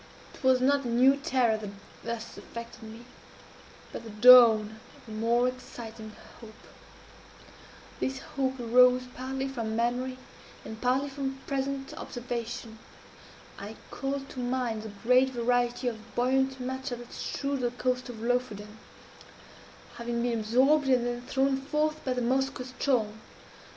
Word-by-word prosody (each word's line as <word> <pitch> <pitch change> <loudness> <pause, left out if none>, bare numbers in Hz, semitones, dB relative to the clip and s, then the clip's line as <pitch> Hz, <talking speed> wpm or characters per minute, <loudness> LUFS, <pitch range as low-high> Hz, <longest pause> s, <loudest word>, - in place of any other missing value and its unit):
"It - - -15
was 260 -1 +4
not 280 +2 +3
a - - -4
new 250 +3 +5
terror 255 -7 +1
that 210 -2 -6 0.3
thus 230 0 -5
affected 235 +1 -9
me, 225 +2 -10 0.9
but - - -6
the 225 - -9
dawn 220 -1 +7 0.2
of - - -20
a - - -9
more 235 +3 +2
exciting 230 -3 -7 0.3
hope. 220 -2 -12 1.4
This 265 0 -1
hope 265 -1 -3
arose 250 +1 +5
partly 265 +1 -3
from 230 -5 -3
memory, 245 +2 -1 0.5
and 220 0 -8
partly 255 +3 +2
from 270 -1 -4
present 275 0 -3
observation. 235 -2 -6 0.8
I 205 +2 -7 0.2
called 275 0 -3
to - - -8
mind 245 -3 -1
the 220 - -7
great 250 +6 +3
variety 245 0 0
of 230 -1 -6
buoyant 265 +2 +1
matter 260 0 -4
that 240 0 -11
strewed 280 0 -3
the 245 -1 0
coast 250 +1 -2
of 225 -3 -8
Lofoden, 220 -3 -2 1.2
having 235 0 -2
been 235 -2 0
absorbed 265 +7 +3
and 250 -2 +3
then 240 0 -2
thrown 270 +2 +1
forth 305 +2 -1
by 260 - 0
the 250 - -2
Moskoe 265 +1 0
ström. 255 -4 0
250 Hz, 140 wpm, -29 LUFS, 230-265 Hz, 1.4 s, dawn